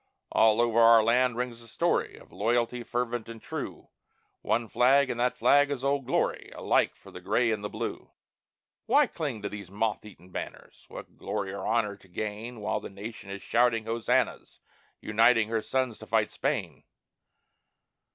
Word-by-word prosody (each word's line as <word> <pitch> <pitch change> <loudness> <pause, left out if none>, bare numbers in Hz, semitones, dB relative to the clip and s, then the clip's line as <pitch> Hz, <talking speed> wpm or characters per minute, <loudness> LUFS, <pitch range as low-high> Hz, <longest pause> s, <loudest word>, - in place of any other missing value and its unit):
All 110 0 +4
over 115 -1 +2
our 115 -1 +7
land 125 +1 +2
rings 125 -2 -3
the 115 - -15
story 110 - 0
Of - - -17
loyalty, 120 +2 0
fervent 120 -1 -3
and 115 -1 -8
true; - - -7 0.5
"One 115 0 0
flag," 130 +4 +4
and 120 - -5
that 125 +1 +1
flag 145 0 +4
is 135 -3 -3
"Old 140 -2 0
Glory," - - -1
Alike - - +1
for - - -16
the 90 - -10
Gray 115 +5 +1
and 105 -2 -2
the 105 - -3
Blue. - - -5 0.8
Why - - +5
cling 135 -10 -5
to 100 - -2
those 100 -3 -8
moth 105 +2 -1
eaten 95 -4 -15
banners? - - -8
What - - -11
glory 100 -2 -3
or 100 - -5
honor 105 -3 0
to 95 - -21
gain 110 +5 -5
While 110 +1 -1
the - - -8
nation 100 +1 -9
is 100 0 -7
shouting 115 -2 +2
hosannas, 115 0 -1 0.4
Uniting 115 0 +3
her 115 -1 0
sons 130 -1 -1
to - - -11
fight - - +1
Spain? - - -3
115 Hz, 170 wpm, -28 LUFS, 105-120 Hz, 0.8 s, our